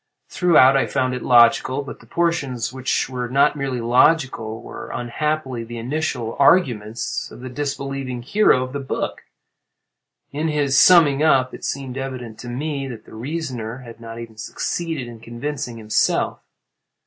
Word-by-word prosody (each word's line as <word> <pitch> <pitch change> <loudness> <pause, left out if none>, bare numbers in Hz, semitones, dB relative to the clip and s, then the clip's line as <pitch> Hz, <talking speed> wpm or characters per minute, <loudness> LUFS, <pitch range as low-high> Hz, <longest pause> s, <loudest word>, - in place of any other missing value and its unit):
Throughout 155 -7 +5
I 135 - +2
found 130 -1 0
it 125 - -4
logical, 125 +3 +4
but 140 - -9
the - - -18
portions 140 -9 -1
which 130 0 -1
were 125 -2 -4
not 140 +3 +3
merely 135 -3 -2
logical 120 -2 +2
were - - -9
unhappily 130 0 -2
the 120 +1 -8
initial 125 -2 -2
arguments 120 - +2
of - - -12
the 130 - -6
disbelieving 135 -2 -4
hero 140 - +3
of 130 0 -7
the 140 - -2
book. 135 - -3 1.1
In 150 +3 -2
his 145 -3 +1
summing 150 -3 +6
up 130 -5 +3
it - - -10
seemed 135 -1 -4
evident 125 -4 -6
to 120 - -7
me 140 +2 -3
that 115 -4 -9
the - - -15
reasoner 125 -2 -5
had 115 -1 -11
not 115 0 -8
even 115 -2 -9
succeeded 160 +4 -3
in 120 -1 -10
convincing 120 +2 -5
himself. 110 -1 0
130 Hz, 155 wpm, -21 LUFS, 120-145 Hz, 1.1 s, summing